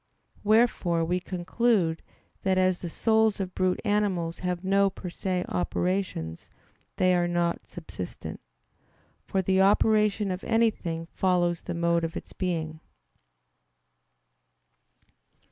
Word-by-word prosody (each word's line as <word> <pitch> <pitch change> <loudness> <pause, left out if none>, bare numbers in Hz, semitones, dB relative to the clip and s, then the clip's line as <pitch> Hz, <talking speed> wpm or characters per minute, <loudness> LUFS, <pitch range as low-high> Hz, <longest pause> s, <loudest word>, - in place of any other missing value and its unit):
Wherefore 210 -6 +3
we 180 +2 0
conclude 185 -1 0 0.4
that 190 -1 +1
as 185 -1 +2
the 175 - -5
souls 220 +3 +2
of 185 -2 -3
brute 185 -1 +1
animals 195 -6 0
have 180 0 -2
no 195 +1 +3
per 185 -1 -8
se 180 0 -2
operations 180 - -2 0.5
they 185 0 +3
are 175 -1 +2
not 175 -1 -1
subsistent. 155 - -7 0.9
For 190 -1 0
the 190 +1 +3
operation 210 0 +3
of 185 +1 -4
anything 210 -8 0
follows 175 -2 +1
the - - -5
mode 170 0 +1
of 165 0 -3
its - - -9
being. 160 -4 -3
185 Hz, 115 wpm, -27 LUFS, 170-200 Hz, 0.9 s, Wherefore